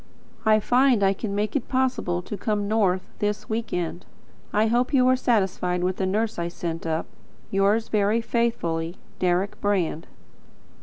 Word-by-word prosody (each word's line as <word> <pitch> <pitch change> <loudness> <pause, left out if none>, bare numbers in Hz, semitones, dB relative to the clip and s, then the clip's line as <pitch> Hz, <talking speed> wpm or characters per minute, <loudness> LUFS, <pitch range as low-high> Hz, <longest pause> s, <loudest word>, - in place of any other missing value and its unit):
I 215 0 +6
find 245 -1 +3
I 195 0 +4
can 200 0 -4
make 210 +5 -1
it 270 - -1
possible 255 -9 0
to 210 - -5
come 205 -1 -1
north 195 -4 +2 0.2
this 210 0 -1
week 225 +1 -2
end. 175 0 -3 0.5
I 210 +1 +3
hope 245 +5 +1
you 255 -1 +5
are 255 - +5
satisfied 190 -7 0
with 185 0 0
the 190 - 0
nurse 215 +1 -1
I 170 - -1
sent 165 -1 -5
up. 160 0 -1 0.5
Yours 200 +3 +2
very 210 +1 +2
faithfully, 185 -9 -1 0.2
Deryck 180 +2 0
Brand. 180 -5 0
205 Hz, 160 wpm, -25 LUFS, 180-225 Hz, 0.5 s, I